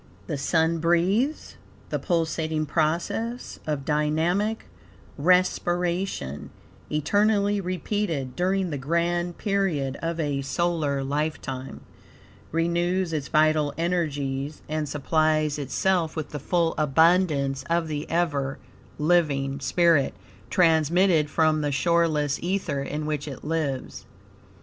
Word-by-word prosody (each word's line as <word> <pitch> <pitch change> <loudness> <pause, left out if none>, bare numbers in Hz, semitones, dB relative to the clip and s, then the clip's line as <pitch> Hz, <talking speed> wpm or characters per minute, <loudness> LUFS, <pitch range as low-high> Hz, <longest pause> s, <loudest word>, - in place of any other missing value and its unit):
The 155 - -3
Sun 160 +4 +1
breathes. 185 - +1 0.3
The - - -1
pulsating 160 -3 -1
process 170 - -1
of 145 -3 -2
dynamic 160 +8 0 0.5
respiration, 175 - 0 0.4
eternally 205 +6 +2
repeated 180 -7 -2
during 185 0 0
the 145 - -3
grand 170 +4 -1
period 185 -10 -1
of 165 0 -2
a 145 -3 -1
solar 145 -1 -1
lifetime, 135 -2 -3 0.7
renews 170 +2 0
its 150 -2 -2
vital 155 -2 +2
energies, 150 -5 -2
and 155 -1 -2
supplies 155 0 +1
itself, 165 +4 0
with 155 -2 -4
the 150 - -5
full 165 +3 +1
abundance 150 -2 +3
of 170 -1 +1
the 150 -1 -4
ever 145 -5 0 0.4
living 145 -4 +1
spirit, 165 0 +2 0.3
transmitted 165 -1 +3
from 155 0 +2
the 145 -1 -1
shoreless 155 -2 +1
ether 180 -6 -1
in 150 +2 -4
which 150 -1 -3
it 135 -3 -8
lives. 150 -4 -3
160 Hz, 105 wpm, -25 LUFS, 145-175 Hz, 0.7 s, abundance